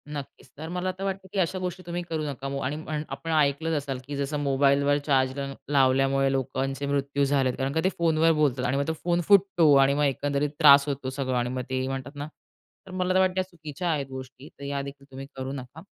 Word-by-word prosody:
नक्कीच, 140 -1 -9
तर 160 +2 -6
मला 180 +1 -2
तर 185 +1 -8
वाटतं, 195 -1 -3
की 195 - 0
अशा 185 +1 0
गोष्टी 180 0 -4
तुम्ही 175 +1 -3
करू 160 -1 -2
नका. 140 -2 -5
ओ 135 0 -3
आणि 140 +4 -2
पण 155 -1 -2
आपण 150 +4 -5
ऐकलंच 155 +1 +2
असाल, 135 -2 -4
की 145 - -4
जसं 140 +1 -2
मोबाईलवर 140 +1 +3
चार्जर 135 0 +1 0.2
लावल्यामुळे 135 0 +3
लोकांचे 135 +1 -2
मृत्यू 140 0 0
झालेत 135 -2 +1
कारण 135 0 -1
का 160 - +1
ते 190 - +3
फोनवर 165 -1 +3
बोलतात 140 -5 +1
आणि 130 +3 +1
मग 140 +1 -1
तो 160 - 0
फोन 175 0 +1
फुटतो 190 -6 +5
आणि 135 0 +5
मग 145 +1 +1
एकंदरीत 140 +1 0
त्रास 140 -2 +8
होतो 135 -2 -3
सगळं. 130 -1 -2
आणि 120 0 0
मग 130 0 -3
ते 130 0 -1
म्हणतात 135 +2 -5
ना, 145 +1 -5 0.6
तर 185 - -10
मला 185 0 0
तर 190 - +4
वाटतं 185 0 +2
चुकीच्या 165 +1 -5
आहेत 145 -3 -1
गोष्टी 130 +1 -9
तर 140 - -15
यादेखील 140 0 -5
तुम्ही 135 +1 -7
करू 130 0 -5
नका. 130 +3 -8
140 Hz, 220 wpm, -26 LUFS, 135-160 Hz, 0.6 s, त्रास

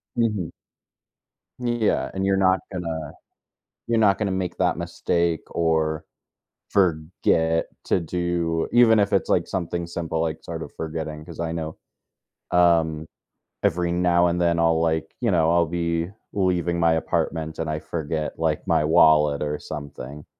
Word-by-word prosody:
Mhm. 105 -7 0 1.1
Yeah, 120 -3 0
and 95 0 -1
you're 95 0 +2
not 95 -1 +3
gonna 80 -4 -4 0.7
you're 115 0 +1
not 100 -3 +4
gonna 105 -2 -1
make 95 -2 -2
that 90 -1 +2
mistake 85 -1 0
or 80 -2 0 0.6
forget 80 -2 +1 0.2
to - - +1
do 85 -1 -1
even 115 -2 +6
if 100 0 +2
it's 100 - +2
like 85 -1 +2
something 85 -2 -3
simple, 80 -1 -3
like 80 -1 -2
sort - - -6
of - - -7
forgetting 80 -1 -5
'cause - - -9
I 80 -1 -2
know, 80 -1 -4 0.7
um, 80 -3 +3 0.6
every 85 0 +1
now 90 0 +3
and 85 0 0
then 85 -1 +2
I'll 80 -1 +3
like, 80 -1 -1
you 115 -4 +2
know, 80 -2 +3
I'll 85 0 +4
be 85 0 -1 0.2
leaving 90 -3 0
my 85 -1 +4
apartment 80 0 -2
and 80 -1 -2
I 75 0 -2
forget, 80 0 -4
like, 80 -2 0
my - - +3
wallet 75 -2 +5
or 75 0 -1
something, 75 -1 -8
85 Hz, 150 wpm, -24 LUFS, 80-90 Hz, 1.1 s, even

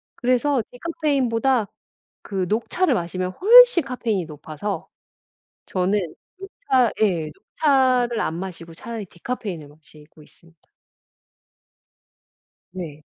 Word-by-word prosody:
그래서 255 +1 +1
디카페인보다 265 -6 0 0.6
그 190 -3 -3
녹차를 255 - +1
마시면 185 0 -3
훨씬 475 - +7
카페인이 230 -8 -2
높아서 155 +6 -6 0.8
저는 190 +2 0 0.4
녹차 270 - 0
예. 170 -7 +1
녹차를 255 -5 +1
안 160 - -1
마시고 170 -2 -7
차라리 225 +2 -7
디카페인을 175 -4 -6
마시고 150 +1 -19
있습니다. 165 +1 -22 2.1
네. 155 -5 -8
215 Hz, 240 characters per minute, -22 LUFS, 170-260 Hz, 2.1 s, 훨씬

